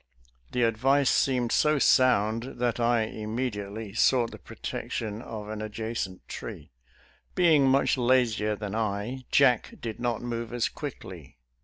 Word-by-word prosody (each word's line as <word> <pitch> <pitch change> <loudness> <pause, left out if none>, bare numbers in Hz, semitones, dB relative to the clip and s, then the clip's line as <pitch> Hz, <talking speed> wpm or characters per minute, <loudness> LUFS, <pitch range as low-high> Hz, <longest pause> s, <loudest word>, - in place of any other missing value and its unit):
"" - - -35
The 125 - +1
advice 130 +5 +3
seemed 125 -3 +1
so 150 0 +3
sound 120 -2 +3
that 120 -1 0
I 120 -1 +3
immediately 110 -2 -4
sought 120 +1 +3
the - - -10
protection 110 -1 -5
of 110 -3 -7
an 110 0 -5
adjacent 110 -3 -5
tree. - - -8 0.6
Being 160 -6 +5
much 135 0 +3
lazier 120 -4 +2
than 105 -1 -6
I, 110 +4 -3
Jack 125 -5 +3
did 115 -2 -6
not 120 -1 -2
move 120 -1 -4
as 120 -1 0
quickly. 95 - -9
115 Hz, 140 wpm, -27 LUFS, 105-125 Hz, 0.6 s, Being